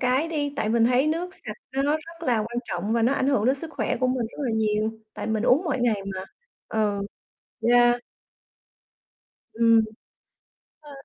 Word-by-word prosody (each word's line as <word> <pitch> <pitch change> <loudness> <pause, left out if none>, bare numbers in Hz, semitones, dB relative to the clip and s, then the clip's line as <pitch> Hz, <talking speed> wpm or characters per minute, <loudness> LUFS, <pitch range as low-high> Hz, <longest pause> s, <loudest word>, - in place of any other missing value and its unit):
cái 260 +6 +2
đi, 290 -3 -2
tại 215 - 0
mình 230 +1 +3
thấy 250 +4 +3
nước 345 +4 -1
sạch - - -7 0.2
nó 270 +1 0
nó 290 +1 +2
rất 330 +1 -12
là 240 -3 +3
quan 235 +3 -3
trọng 215 +1 -2
và 230 -1 +2
nó 245 +4 +3
ảnh 265 +1 +1
hưởng 220 -6 +2
đến 260 - +4
sức 315 +3 -7
khỏe - - -1
của 255 - +3
mình 255 -3 0
rất - - -13
là 245 - 0
nhiều, 215 0 +1 0.2
tại - - -5
mình 220 -1 0
uống 280 +9 +4
mỗi 275 -6 -1
ngày 220 -5 +1
mà, 185 0 -5 0.4
ừ. 210 -2 0 0.7
Yeah. 240 0 +5 1.5
Ừm. 230 0 +5 1.0
Ơ, 295 -1 -14
245 Hz, 190 wpm, -25 LUFS, 220-285 Hz, 1.5 s, Yeah